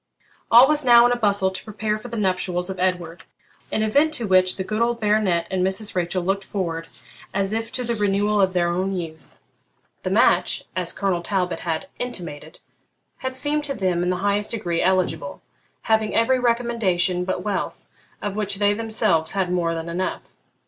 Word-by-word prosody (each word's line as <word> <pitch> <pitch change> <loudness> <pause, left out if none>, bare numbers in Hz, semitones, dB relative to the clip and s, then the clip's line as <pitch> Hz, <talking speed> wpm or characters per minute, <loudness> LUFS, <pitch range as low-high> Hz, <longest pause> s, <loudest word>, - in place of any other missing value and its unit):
All 240 +3 +8
was 300 0 +1
now 240 -1 +7
in 245 - +3
a - - +3
bustle 200 -4 +1
to 190 - -7
prepare 215 0 -3
for 215 - -9
the 230 -1 -5
nuptials 185 -2 -1
of 190 - -7
Edward, 180 -1 -2 0.5
an 215 - 0
event 290 +8 +2
to 235 - -2
which 185 -2 +3
the 190 - -3
good 215 +3 -2
old 235 0 +1
Baronet 210 -6 +2
and 185 -1 0
Mrs. 190 +3 -1
Rachel 180 0 -1
looked 195 +2 0
forward 165 -4 -4 0.5
as 195 +1 0
if 225 +1 -3
to 250 - -2
the 235 -1 -1
renewal 205 -1 +1
of 190 -1 +2
their 175 -1 +2
own 185 +3 -1
youth. 165 -3 -8 0.6
The - - -3
match, - - +3
as 180 -2 0
Colonel 190 -4 -1
Talbot 180 -2 -1
had 165 +9 -3
intimated, 165 -10 -6 0.6
had 260 0 -4
seemed 295 +2 -1
to 275 -1 -3
them 185 -5 0
in 180 - 0
the 180 - +1
highest 205 +1 +1
degree 175 -7 -1
eligible, 185 -1 0 0.4
having 220 -1 +1
every 255 +3 +3
recommendation 230 -7 +1
but 185 - -3
wealth, 205 -2 -3 0.4
of 205 -1 -3
which 205 -2 -1
they 205 +1 +2
themselves 215 -7 +1
had 190 -2 0
more 170 -2 0
than 165 0 -5
enough. 180 +2 -4
195 Hz, 185 wpm, -23 LUFS, 180-220 Hz, 0.6 s, All